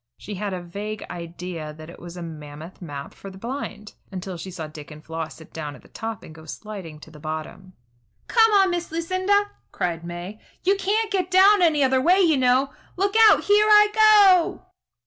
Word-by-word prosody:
She 210 - -8
had 205 +1 -4
a 180 -2 -5
vague 205 +5 -6
idea 170 -2 -7
that 155 0 -11
it - - -14
was 175 +1 -10
a 175 - -6
mammoth 155 +1 -10
map 145 -5 -7
for 195 - -10
the 190 - -12
blind, 225 -2 -6 0.2
until 185 -1 -6
she 170 +3 -7
saw 175 -3 -6
Dick 155 -1 -11
and 150 0 -13
Floss 160 -1 -5
sit 160 - -16
down 150 -3 -6
at - - -17
the - - -19
top 225 -2 -6
and 155 - -12
go 160 0 -14
sliding 185 -4 -8
to 160 - -13
the 150 - -14
bottom. 155 +4 -7 0.5
"Come 450 -2 +4
on, 390 -2 +5
Miss 345 -2 -3
Lucinda!" 370 +5 0 0.2
cried 170 -2 -3
May. 175 +5 -7 0.2
"You 390 +2 +3
can't 420 +3 0
get 370 -3 0
down 385 +2 +6
any 310 -4 +4
other 260 0 +3
way, 360 +7 +4
you 335 -5 +4
know. 260 +2 +2 0.2
Look 395 +2 +1 0.2
out! - - +4
Here 415 +1 +4
I 420 0 +7
go!" 415 -5 +5
205 Hz, 205 wpm, -23 LUFS, -, 0.5 s, I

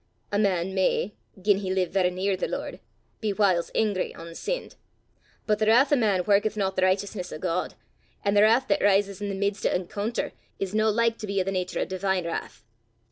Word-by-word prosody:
A 205 - +1
man 190 -3 +1
may, 190 +1 +1 0.3
gien 200 +1 +3
he 190 -2 -3
live 185 -2 0
varra 185 -1 +2
near 190 +2 -1
the 185 - -2
Lord, - - -5 0.4
be 215 - -1
whiles 190 -4 +2
angry 205 -4 0
ohn 165 0 -9
sinned: - - -4 0.7
but 210 -1 +1
the 215 - +1
wrath 260 +6 +5
o' - - +7
man 205 -8 +2
warketh 205 +2 +2
not 190 -2 0
the - - 0
richteousness 185 0 0
o' - - -5
God; 180 +1 -2 0.5
an' 200 - +2
the 205 - +5
wrath 225 +5 +4
that 200 - +2
rises 200 -1 +2
i' 205 - -2
the 200 - -3
mids 200 +1 -1
o' - - +3
encoonter, 200 +5 -2 0.3
is 195 0 -3
no 215 0 +3
like 230 +1 +1
to 215 - -5
be 200 0 0
o' - - +2
the 195 - -2
natur 185 -1 -2
o' - - +1
divine 190 -1 -1
wrath. 170 - -5
200 Hz, 215 wpm, -26 LUFS, 185-210 Hz, 0.7 s, o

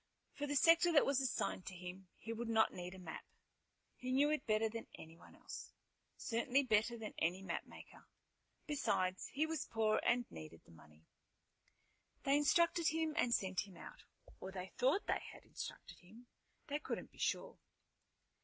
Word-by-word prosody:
For 290 - -3
the 290 - -1
sector 335 +4 +6
that 295 - +6
was 275 -1 +2
assigned 245 -7 -1
to 185 - -5
him 180 +1 -8
he 225 - -5
would 230 +1 -4
not 220 -1 +4
need 180 +1 -6
a - - -10
map. 180 -3 -7 0.7
He 255 0 -4
knew 285 +3 +4
it 305 - -1
better 215 0 +3
than 230 +1 -6
anyone 165 +1 -13
else, - - -8 0.4
certainly 250 +4 +1
better 225 -1 +2
than 220 -2 -6
any 180 +4 0
mapmaker. - - -7 0.6
Besides, 185 - 0
he 300 +3 0
was 315 -3 -3
poor 220 -1 +2
and 240 0 +3
needed 80 +1 -9
the - - -18
money. 75 -1 -18 1.2
They 275 - +4
instructed 335 +3 +4
him 320 -1 +1
and 245 - +2
sent 190 -2 +1
him 185 -3 -13
out. - - -11 0.4
Or 190 - -6
they 190 -1 -6
thought 270 +11 +2
that - - +1
they - - -13
had - - -18
instructed - - -8
him. 220 +7 -15 0.4
They 290 +1 -2
couldn't - - -4
be - - -19
sure. - - -1
225 Hz, 170 wpm, -38 LUFS, 185-285 Hz, 1.2 s, sector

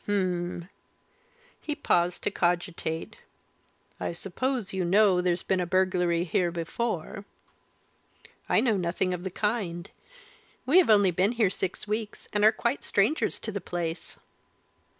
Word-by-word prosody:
"Hum!" 180 -3 -1 0.9
He 300 - -3
paused 175 - +1
to - - 0
cogitate. 175 -2 -2 0.8
"I - - -3
suppose 220 +5 -2
you 190 -1 -1
know 190 0 +4
there's 180 0 0
been 190 - 0
a 180 - -1
burglary 180 -2 +2
here 175 0 +1
before?" 180 +3 -3 1.3
"I - - +4
know 225 -5 +2
nothing 180 +1 -1
of 180 0 -5
the 190 - -3
kind. 190 -4 -2 0.7
We 310 +8 +6
have 360 - +3
only 205 -3 +5
been 190 +6 +1
here 220 -6 +2
six 190 +1 -4
weeks, 215 0 -4
and 210 0 +1
are 215 - +8
quite 235 +4 -2
strangers 215 +11 +1
to 220 - -4
the 200 -1 -4
place." 170 -1 -5
185 Hz, 140 wpm, -27 LUFS, 175-215 Hz, 1.3 s, are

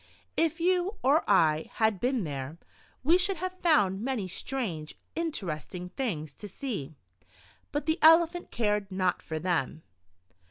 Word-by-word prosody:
If 330 0 +1
you 365 +4 +1
or 285 +5 +4
I 160 -5 +3
had 220 -3 +2
been 250 -1 0
there, 140 0 -5 0.5
we 335 +6 +5
should 380 0 +2
have 370 +2 -5
found 205 - +3
many 240 -5 -2
strange, 185 -6 -4 0.2
interesting 180 - -4
things 170 - -3
to 210 - -6
see, 195 - -5 0.8
but 290 0 -2
the 315 +2 +1
Elephant 335 +2 +5
cared 210 -3 -1
not 185 -1 0
for 160 - -5
them. 160 -3 -1
220 Hz, 135 wpm, -29 LUFS, -, 0.8 s, we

